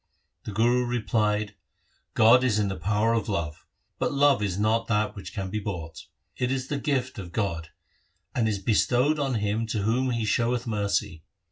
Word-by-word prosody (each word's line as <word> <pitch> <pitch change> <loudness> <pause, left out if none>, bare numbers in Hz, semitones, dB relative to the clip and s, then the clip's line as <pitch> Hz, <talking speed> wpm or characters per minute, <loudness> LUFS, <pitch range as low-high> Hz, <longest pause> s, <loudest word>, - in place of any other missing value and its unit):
The - - -5
Guru 120 +4 +2
replied, 105 -3 0 0.3
' - - -42
God 120 +3 +6
is 120 -5 +2
in 105 -2 +1
the 95 - -3
power 105 +7 +1
of 115 0 -1
love, 85 -5 -3 0.3
but - - 0
love 140 -4 +4
is 100 -3 -1
not 110 +2 +1
that 105 -1 0
which 100 - -8
can 95 -2 -5
be 105 - -1
bought. 85 -6 -6 0.3
It 125 0 -1
is 130 -1 -2
the 145 - -1
gift 130 -5 -1
of 90 -3 -8
God, 85 -5 -2 0.6
and 115 -3 +1
is 105 - -1
bestowed 125 +8 +2
on 135 -3 0
him 110 +1 -1
to 110 -2 -2
whom 125 +5 +1
He 115 -2 -1
showeth 120 +3 +1
mercy. 100 -7 -1
110 Hz, 190 wpm, -26 LUFS, 100-125 Hz, 0.6 s, God